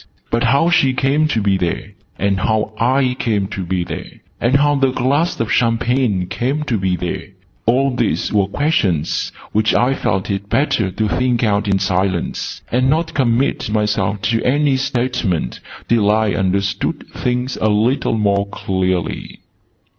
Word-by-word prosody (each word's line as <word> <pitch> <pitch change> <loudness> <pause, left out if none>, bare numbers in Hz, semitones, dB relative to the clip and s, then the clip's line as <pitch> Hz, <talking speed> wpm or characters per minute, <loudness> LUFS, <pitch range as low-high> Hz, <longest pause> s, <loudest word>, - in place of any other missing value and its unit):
But 115 0 +1
how 165 +5 +3
she 135 -7 +3
came 140 +4 +2
to 115 -8 0
be 100 -1 +2
there 90 +2 -3 0.3
and 100 -1 0
how 110 +1 0
I 130 +1 +2
came 105 -4 0
to 95 - -4
be 90 0 -1
there - - -6 0.3
and 120 +3 +2
how 145 +1 +4
the 135 -2 +2
glass 145 +7 0
of 115 -1 -1
champagne 115 -4 +1
came 135 +10 -2
to 120 -8 -1
be 95 -1 0
there 90 -1 -4 0.4
all 130 +2 +2
these 120 -3 -1
were 100 -2 +3
questions 100 - 0 0.2
which 110 +1 +2
I 125 +2 +3
felt 95 -7 -1
it 100 +1 -4
better 120 -8 +1
to 105 +4 -1
think 125 +1 0
out 105 -1 +1
in 100 -1 +2
silence, 95 -2 -2
and 130 +2 +2
not 160 +3 0
commit 125 -2 +1
myself 105 -2 0
to 115 0 +1
any 145 +1 +2
statement 120 - -1 0.3
till 110 -3 +3
I 110 0 +2
understood 95 +1 -1
things 125 +1 -2
a 110 - +3
little 110 +3 +1
more 100 -1 +1
clearly. 95 -3 -2
110 Hz, 160 wpm, -18 LUFS, 100-130 Hz, 0.4 s, how